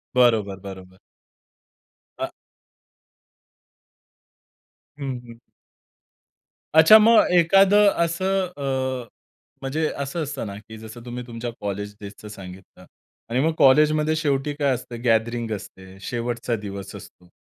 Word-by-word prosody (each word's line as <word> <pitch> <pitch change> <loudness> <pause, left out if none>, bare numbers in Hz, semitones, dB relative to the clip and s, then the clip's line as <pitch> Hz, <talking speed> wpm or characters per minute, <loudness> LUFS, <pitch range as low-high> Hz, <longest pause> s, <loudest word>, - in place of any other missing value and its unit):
बरोबर. 110 -6 +3
बरोबर. 95 -1 -11 1.2
अ - - -3 2.7
हं, 135 -3 -4
हं. 115 0 -13 1.3
अच्छा, 160 +7 +9
मग 225 +1 +6
एखादं 195 +4 +5 0.2
असं 190 +3 0
अ, 130 -3 -2 0.5
म्हणजे 155 +4 -1
असं 140 +4 -3
असतं 145 - -5
ना 100 - -7
की 110 +1 -12
जसं 110 +2 -11
तुम्ही 125 0 -6
तुमच्या 120 0 -5
कॉलेज 105 0 -4
डेजचं 100 +1 -10
सांगितलं. 95 -2 -12 0.4
आणि 120 +2 0
मग 165 - +1
कॉलेजमध्ये 150 +3 +4
शेवटी 145 -2 -1
काय 140 -2 +2
असतं, 120 -1 -7
गॅदरिंग 115 0 +1
असते. 95 -1 -12
शेवटचा 120 +1 -3
दिवस 100 -3 -7
असतो. 90 - -14
120 Hz, 110 wpm, -23 LUFS, 105-150 Hz, 2.7 s, अच्छा